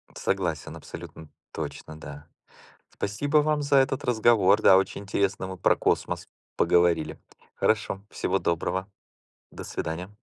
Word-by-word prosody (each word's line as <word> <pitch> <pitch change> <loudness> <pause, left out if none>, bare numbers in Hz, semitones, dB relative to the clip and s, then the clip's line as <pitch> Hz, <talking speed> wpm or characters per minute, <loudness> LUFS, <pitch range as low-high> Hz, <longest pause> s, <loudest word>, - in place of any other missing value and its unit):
Согласен, 85 -6 -2
абсолютно 80 -2 -10 0.2
точно, 80 0 -7
да. 75 0 -10 0.6
Спасибо 140 +10 -1
вам 150 0 +2
за 140 0 +1
этот 135 0 +2
разговор, 110 -3 +4
да. 95 - +7
Очень 95 +1 -1
интересно 100 -1 -1
мы 95 -1 -7
про - - +3
космос - - -1 0.3
поговорили. 85 -2 +2 0.4
Хорошо, 100 -2 0
всего 95 - -1
доброго. 95 +4 -1 0.6
До - - -8
свидания. 90 +6 -5
95 Hz, 120 wpm, -26 LUFS, 85-110 Hz, 0.6 s, да